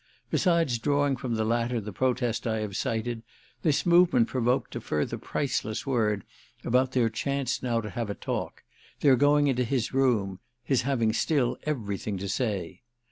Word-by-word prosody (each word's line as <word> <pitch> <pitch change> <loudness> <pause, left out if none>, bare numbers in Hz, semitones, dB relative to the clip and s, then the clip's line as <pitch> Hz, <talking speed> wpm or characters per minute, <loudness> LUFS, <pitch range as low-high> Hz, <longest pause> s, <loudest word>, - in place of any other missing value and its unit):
Besides 165 - +2
drawing 145 +1 +1
from 120 -2 -3
the 110 0 0
latter 120 +1 0
the 105 -1 -7
protest 125 +1 0
I 110 -1 0
have 105 -3 -4
cited 115 +2 -2 0.4
this 150 -3 +1
movement 170 -9 +5
provoked 125 0 0
a - - -3
further 75 -1 -2
priceless 110 -6 -2
word 110 -7 +1 0.4
about 130 +2 +2
their 125 -3 +3
chance 135 +3 -2
now 120 -2 0
to 105 - -6
have 115 -1 -3
a 100 - -3
talk, - - -4 0.4
their 140 -3 +6
going 145 +3 +4
into 130 -3 +2
his 125 0 -1
room, 110 -8 +1 0.2
his 135 -4 +2
having 115 -4 +1
still 135 0 +1
everything 105 -7 -2
to 100 +2 -4
say. 95 -5 -2
120 Hz, 165 wpm, -27 LUFS, 110-135 Hz, 0.4 s, their